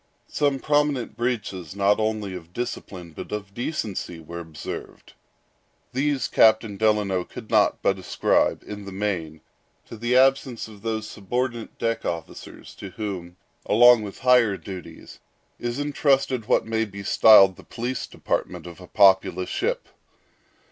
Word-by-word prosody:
Some 145 -2 0
prominent 145 -3 0
breaches, 105 -8 -3
not 100 +1 +2
only 110 -3 -1
of 85 -1 -10
discipline 90 -7 -6
but - - -9
of 100 -2 -5
decency, 105 - -4
were 85 +2 -8
observed. 80 -3 -8 0.8
These 140 +1 0
Captain 110 -1 +4
Delano 105 -3 +1
could - - -11
not - - +3
but - - +1
ascribe, - - +1
in 105 -1 -8
the 100 - -7
main, 90 -6 -3 0.4
to - - -10
the 120 +3 +1
absence 130 -3 +2
of 105 -2 -14
those 110 -1 -3
subordinate 120 +3 -4
deck 115 0 -1
officers 85 -2 -7
to 100 - -8
whom, 95 -4 -6 0.3
along 120 +2 +6
with 100 -2 -7
higher 125 -6 +4
duties, 95 -4 -10 0.4
is 120 +1 -3
intrusted 135 -5 +1
what - - +2
may 110 0 0
be 100 -2 -7
styled 100 -2 +7
the - - -15
police 120 +1 -4
department - - -3
of 85 +1 -10
a 90 - -11
populous 95 -2 +3
ship. - - -2
110 Hz, 140 wpm, -24 LUFS, 95-120 Hz, 0.8 s, styled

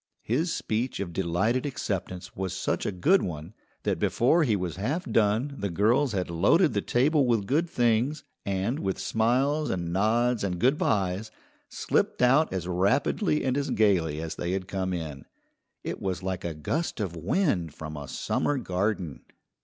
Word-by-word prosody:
His 155 +10 0
speech 115 0 -2
of 90 -4 -4
delighted 95 +8 0
acceptance 95 - -4
was 95 -1 -3
such - - -1
a - - 0
good 160 - +3
one 80 +2 -5 0.3
that - - 0
before 155 +8 +3
he 115 -8 +2
was 90 -3 -3
half 145 - -2
done 115 - +1
the 100 - -1
girls 110 - +2
had 90 -3 -2
loaded 115 - +4
the 100 - +1
table 140 +5 +2
with 115 -4 +2
good 160 - +1
things, 120 +1 +1 0.2
and, 100 +8 -1
with 95 -8 -2
smiles 135 +7 +1
and 85 -2 -2
nods 115 +4 +2
and 90 -3 -1
"good 130 - +2
byes," 100 +1 0 0.4
slipped - - 0
out 135 +6 +4
as 90 -2 -3
rapidly 135 - +1
and 130 -1 +1
as 140 0 -1
gayly 85 -8 +2
as 80 0 -4
they 85 +1 -2
had 95 -1 -3
come 95 -1 -2
in. 80 -6 -5 0.6
It - - -5
was 95 -1 -2
like 95 -1 -3
a 85 -2 -3
gust 135 - -2
of 95 -5 -3
wind 90 - 0
from 80 0 -7
a 70 -1 -7
summer 145 - -1
garden. 95 - -2
105 Hz, 170 wpm, -27 LUFS, 90-130 Hz, 0.6 s, loaded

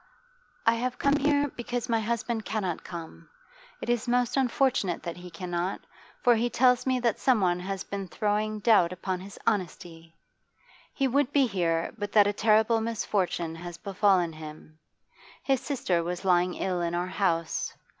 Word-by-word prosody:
'I 230 - +5
have 250 +2 -2
come 280 +1 +2
here 290 0 +2
because 245 0 -3
my 230 -2 +2
husband 230 0 -2
cannot 195 -7 -3
come. 160 - -9 0.5
It - - -5
is 240 0 0
most 245 0 +1
unfortunate 255 -8 +1
that 170 0 -5
he 180 0 -9
cannot, 175 +2 -3 0.4
for 245 - +6
he 235 +2 +1
tells 250 +1 +3
me 255 -1 +2
that 235 -3 +1
someone 190 -9 +2
has 190 +1 -4
been 200 -1 -5
throwing 210 +2 -1
doubt 205 -6 +4
upon 185 0 -3
his 195 +2 -10
honesty. 165 -5 -3 0.8
He 270 - 0
would 275 +1 +1
be 280 -2 +4
here, 170 -6 -1
but 205 0 -4
that 210 -2 +7
a 205 - +1
terrible 220 +2 +3
misfortune 195 -7 -1
has 175 0 -8
befallen 190 -2 +2
him. 155 0 -11 0.6
His 270 -2 +1
sister 250 - 0
was 175 +2 -4
lying 180 -1 +3
ill 180 -2 -1
in 170 0 -1
our 175 +1 0
house. 175 -3 -1
205 Hz, 165 wpm, -28 LUFS, 175-240 Hz, 0.8 s, that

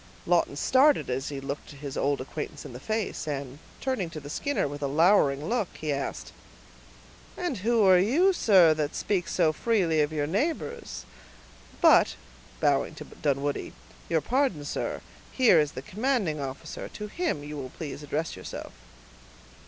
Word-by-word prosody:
Lawton - - +2
started 270 - +3
as 135 +3 -2
he 140 -2 -5
looked 140 +2 -6
his 140 -1 -7
old 140 0 +1
acquaintance 150 +2 -6
in - - -8
the 125 - -8
face, 215 +1 -3
and, 140 -1 -4 0.2
turning 255 -10 -1
to 160 - -7
the 145 0 -9
Skinner 285 - -1
with 145 +1 -7
a 140 - 0
lowering 150 -2 +3
look, 230 -3 0
he 155 -2 -1
asked,— 140 0 -4 1.0
"And 350 -9 -2
who 225 +2 +2
are 185 -1 +7
you, 310 - +4
sir, 185 - +6
that 155 -1 -2
speak 190 -4 -1
so 165 -3 +2
freely 175 -6 +2
of 150 +1 0
your 150 -2 -1
neighbors? 315 - -2 0.8
But," - - +6 0.4
bowing - - +1
to - - -9
Dunwoodie, 145 0 -2 0.4
"your 160 -2 +2
pardon, 245 - 0
sir; - - -3 0.3
here 235 -10 +5
is 150 -1 0
the 130 - -7
commanding 210 - -1
officer; 135 0 -6
to 210 - -7
him 210 - -2
you 150 +1 -7
will 135 -3 -5
please 145 +1 -7
address 150 +2 -3
yourself." 95 - -8
155 Hz, 160 wpm, -27 LUFS, 145-220 Hz, 1.0 s, are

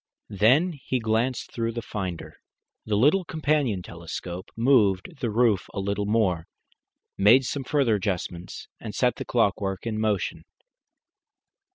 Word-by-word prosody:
Then 130 - +4
he 130 - -1
glanced 115 +3 -1
through 115 -1 -2
the 115 0 -4
finder, 95 -7 -5 0.5
the 105 - +1
little 150 - +4
companion 150 - 0
telescope, 85 +2 -7
moved 115 - +2
the 120 - -1
roof 110 -3 +2
a - - -2
little 100 +1 -1
more, 95 -7 +1 0.7
made 115 +7 +6
some 140 +2 -3
further 135 -3 +2
adjustments, 90 -3 -3
and 105 -3 -7
set 125 0 +1
the - - -5
clockwork 100 -4 0
in 110 -2 -2
motion. 105 -3 -1
110 Hz, 135 wpm, -26 LUFS, 95-125 Hz, 0.7 s, made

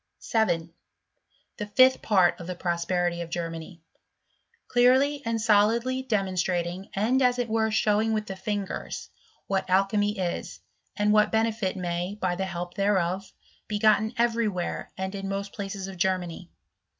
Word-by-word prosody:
7. 170 -7 0 0.8
The 210 - -4
fifth 255 +5 +5
part 185 -5 +3
of 170 - -8
the 180 - -4
Prosperity 175 0 -1
of 170 - -6
Germany; 165 0 -5 0.8
clearly 260 +4 +4
and 230 0 0
solidly 230 +4 +3
demonstrating 185 -5 -1
and 235 +7 +2
as 250 -1 +3
it 245 -1 -1
were 220 0 +1
show 215 -1 +2
ing 225 0 0
with 215 -1 -1
the 195 - -6
fingers, 200 0 -4 0.3
what 195 -1 -1
alchymy 205 +2 +2
is, 180 -2 -3 0.4
and 210 0 +3
what 210 0 +4
bene 225 +1 +2
filniay, 185 -2 -3
by 185 -3 0
the 190 +2 -2
help 175 -1 -5
thereof, 195 -1 0 0.4
be 210 - -2
gotten 220 +2 +3
every 235 -1 +2
where 180 -4 -3
and 190 +1 -3
in 195 -1 -4
most 200 0 -4
places 195 -2 -5
of 190 -1 -8
Germany. 180 -1 -1
195 Hz, 150 wpm, -27 LUFS, 180-220 Hz, 0.8 s, fifth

